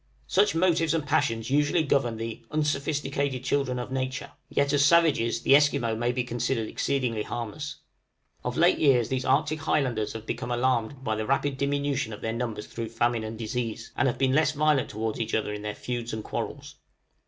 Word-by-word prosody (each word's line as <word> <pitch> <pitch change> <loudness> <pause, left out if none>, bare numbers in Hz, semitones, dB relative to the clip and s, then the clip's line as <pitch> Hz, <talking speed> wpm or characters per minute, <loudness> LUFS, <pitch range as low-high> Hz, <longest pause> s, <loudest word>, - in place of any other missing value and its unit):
Such 200 0 +2
motives 165 -2 +2
and 155 -3 -1
passions 115 -3 0
usually 150 +3 +3
govern 130 -6 +1
the 115 0 -5
"unsophisticated 140 -3 -1
children 130 -2 0
of 125 +1 -5
nature;" 135 +2 -3 0.2
yet, 140 0 +1
as 145 -1 +4
savages, 145 -8 +4
the 135 - +6
Esquimaux 130 -6 +3
may 120 +2 0
be 125 0 -1
considered 120 -1 -1
exceedingly 125 -6 -1
harmless. 120 +7 -5 0.7
Of - - -3
late - - +4
years 125 -6 +4
these 130 -1 -1
Arctic 150 +3 +2
Highlanders 130 -8 0
have 115 -1 -7
become 120 +1 -4
alarmed 125 +1 0
by 110 - 0
the 110 0 -3
rapid 140 +1 +1
diminution 140 -4 0
of 105 - -9
their 110 - -2
numbers 115 -3 -3
through 115 -1 -5
famine 115 0 0
and 110 +1 -5
disease, 115 0 -4
and 140 - +2
have 120 - 0
been 130 -1 +2
less 155 +1 +3
violent 150 -3 +2
towards 110 +1 -3
each 115 - -1
other 105 -1 -1
in 105 - -5
their 105 0 -4
feuds 120 -2 -4
and 110 -1 -4
quarrels. - - -5
130 Hz, 190 wpm, -27 LUFS, 115-145 Hz, 0.7 s, the